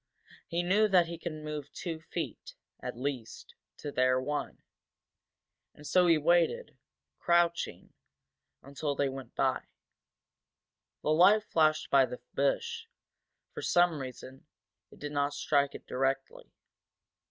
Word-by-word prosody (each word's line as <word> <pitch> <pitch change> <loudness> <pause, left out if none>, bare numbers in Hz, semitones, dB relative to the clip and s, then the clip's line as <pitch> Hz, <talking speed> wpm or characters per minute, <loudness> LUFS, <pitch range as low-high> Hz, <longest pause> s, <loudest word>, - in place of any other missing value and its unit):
He 170 +1 -1
knew 205 +5 +3
that 185 -4 +5
he 170 0 -7
could 170 - -4
move 150 -2 -6
two 165 -2 -5
feet, - - -6 0.2
at - - -6
least, 125 -4 -5 0.2
to 145 - -6
their 130 -1 +3
one. 145 +3 -4 1.1
And 150 - -14
so 180 +5 +4
he 165 -2 +5
waited, 175 - +2 0.4
crouching, 170 0 +1 0.7
until 140 +1 -3
they 140 0 +1
went 130 -3 -9
by. - - +1 1.4
The 155 - +1
light 190 +7 +6
flashed 155 -5 +1
by 135 -2 +6
the 125 - -7
bush, 455 - -1 0.7
for - - -6
some 175 -3 +3
reason, 130 +2 -9 0.4
it - - -17
did 145 0 -6
not 145 0 0
strike 140 -1 +1
it - - -10
directly. 135 +1 -2
150 Hz, 130 wpm, -30 LUFS, 140-175 Hz, 1.4 s, light